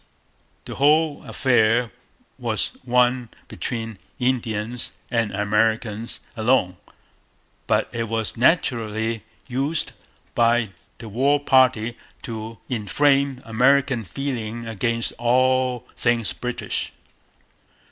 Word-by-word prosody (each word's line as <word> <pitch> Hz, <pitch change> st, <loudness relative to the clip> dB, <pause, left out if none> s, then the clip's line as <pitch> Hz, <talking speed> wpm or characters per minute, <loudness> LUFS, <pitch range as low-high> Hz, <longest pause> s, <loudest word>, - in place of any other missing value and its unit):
The -, -, -6 dB
whole 150 Hz, +2 st, +3 dB
affair 120 Hz, -2 st, +2 dB, 0.5 s
was -, -, -1 dB
one 125 Hz, -1 st, +2 dB, 0.2 s
between 115 Hz, -4 st, -4 dB, 0.2 s
Indians 120 Hz, -2 st, -1 dB
and 115 Hz, -4 st, +1 dB
Americans 105 Hz, +2 st, 0 dB
alone. 110 Hz, -6 st, +2 dB, 0.9 s
But -, -, +2 dB
it 115 Hz, -1 st, -3 dB
was 115 Hz, -1 st, -1 dB
naturally 115 Hz, -, +1 dB, 0.2 s
used 140 Hz, +5 st, -1 dB, 0.4 s
by 115 Hz, -2 st, +3 dB, 0.3 s
the 115 Hz, -, -9 dB
war 135 Hz, +7 st, +2 dB
party 130 Hz, -4 st, +3 dB, 0.2 s
to 110 Hz, -2 st, -6 dB
inflame 135 Hz, +4 st, +1 dB
American 130 Hz, +2 st, +3 dB
feeling 115 Hz, +1 st, -4 dB
against 115 Hz, +1 st, -1 dB
all 130 Hz, 0 st, +2 dB
things 120 Hz, -2 st, +1 dB
British. 125 Hz, 0 st, -3 dB
120 Hz, 90 wpm, -23 LUFS, 110-130 Hz, 0.9 s, whole